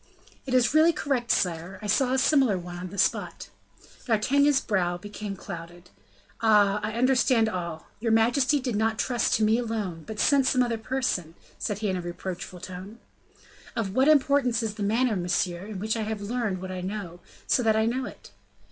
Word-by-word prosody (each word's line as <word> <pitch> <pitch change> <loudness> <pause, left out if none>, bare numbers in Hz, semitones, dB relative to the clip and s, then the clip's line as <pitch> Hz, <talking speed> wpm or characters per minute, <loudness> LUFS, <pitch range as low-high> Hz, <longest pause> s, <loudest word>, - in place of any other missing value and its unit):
"It 255 - 0
is 250 0 +3
really 315 +2 +6
correct, 260 -6 -2
sire: 175 +1 0
I - - -5
saw 250 +5 +2
a 260 - +2
similar 265 -7 +3
one 175 0 -7
on 180 +1 -6
the 200 - -9
spot." - - -1 0.6
D'Artagnan's 275 +5 +3
brow 180 -7 0
became 205 +1 -7
clouded. 175 -2 -9 0.5
"Ah! 210 -2 +4
I 215 +1 -3
understand 250 -1 +3
all. 170 -5 -4
Your 230 +1 0
majesty 245 +6 +3
did 250 -4 -3
not 220 +1 +1
trust 245 0 +1
to 220 - +1
me 220 +2 +3
alone, 210 -8 -3
but 220 -1 -6
sent 275 -3 +4
some 255 -1 +3
other 235 -2 -2
person," 220 -10 -2 0.2
said 205 - -2
he - - +2
in 190 -1 0
a - - -3
reproachful 175 +1 -6
tone. 185 +4 -8 0.8
"Of 210 -5 -2
what 260 +5 +3
importance 280 -5 +3
is 220 -2 -2
the 210 - -9
manner, 225 +3 +1
monsieur, 175 +1 -1
in 215 -2 -6
which 215 +4 -1
I 225 - -2
have 215 0 -3
learnt 205 -3 -2
what 185 0 -6
I 185 -1 -5
know, 185 -2 -5 0.3
so - - +2
that 220 -2 +3
I 220 0 +2
know 250 +3 -1
it?" - - -11
220 Hz, 190 wpm, -26 LUFS, 185-250 Hz, 0.8 s, really